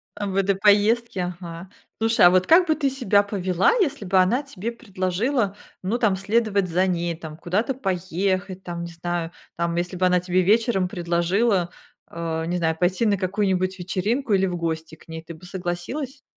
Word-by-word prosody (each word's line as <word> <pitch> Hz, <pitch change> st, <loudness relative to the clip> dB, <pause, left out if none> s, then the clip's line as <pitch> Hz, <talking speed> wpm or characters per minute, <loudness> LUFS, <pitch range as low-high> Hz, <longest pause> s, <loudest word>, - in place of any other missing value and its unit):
В 205 Hz, -2 st, -4 dB
этой 195 Hz, 0 st, +2 dB
поездке? 205 Hz, -2 st, +2 dB
Ага. 170 Hz, 0 st, -8 dB, 0.3 s
Слушай, 225 Hz, -3 st, +4 dB
а -, -, +9 dB
вот 185 Hz, 0 st, +3 dB
как 350 Hz, +2 st, +6 dB
бы 315 Hz, -, +3 dB
ты 285 Hz, -3 st, 0 dB
себя 245 Hz, -7 st, +2 dB
повела, 185 Hz, -3 st, +1 dB
если 295 Hz, -, 0 dB
бы 190 Hz, +1 st, +2 dB
она 185 Hz, +9 st, +3 dB
тебе 235 Hz, -5 st, -5 dB
предложила, 205 Hz, +1 st, -1 dB, 0.3 s
ну 205 Hz, +6 st, 0 dB
там, 210 Hz, -5 st, +2 dB
следовать 200 Hz, -1 st, 0 dB
за 185 Hz, +3 st, +2 dB
ней, 170 Hz, -1 st, -1 dB
там, 160 Hz, -1 st, -9 dB
куда-то 205 Hz, +11 st, -1 dB
поехать, 185 Hz, -2 st, -2 dB
там, 170 Hz, -1 st, -5 dB
не 170 Hz, -, -7 dB
знаю? 170 Hz, 0 st, -3 dB, 0.3 s
Там, 170 Hz, 0 st, -1 dB
если 175 Hz, +2 st, -2 dB
бы 185 Hz, +1 st, +1 dB
она 180 Hz, 0 st, +4 dB
тебе 180 Hz, +1 st, +1 dB
вечером 210 Hz, -1 st, +2 dB
предложила, 175 Hz, +3 st, +1 dB, 0.4 s
а, 165 Hz, -1 st, -3 dB
не 175 Hz, +2 st, -1 dB
знаю, 160 Hz, -2 st, 0 dB
пойти 180 Hz, +5 st, +1 dB
на 205 Hz, -2 st, +2 dB
какую-нибудь 185 Hz, -1 st, 0 dB
вечеринку 205 Hz, +7 st, -1 dB
или 190 Hz, -1 st, +3 dB
в 180 Hz, -, -3 dB
гости 160 Hz, -1 st, -3 dB
к -, -, -22 dB
ней, 160 Hz, 0 st, -7 dB
ты 170 Hz, -, -9 dB
бы 180 Hz, -, -15 dB
согласилась? 190 Hz, +10 st, -5 dB
185 Hz, 185 wpm, -23 LUFS, 175-210 Hz, 0.4 s, а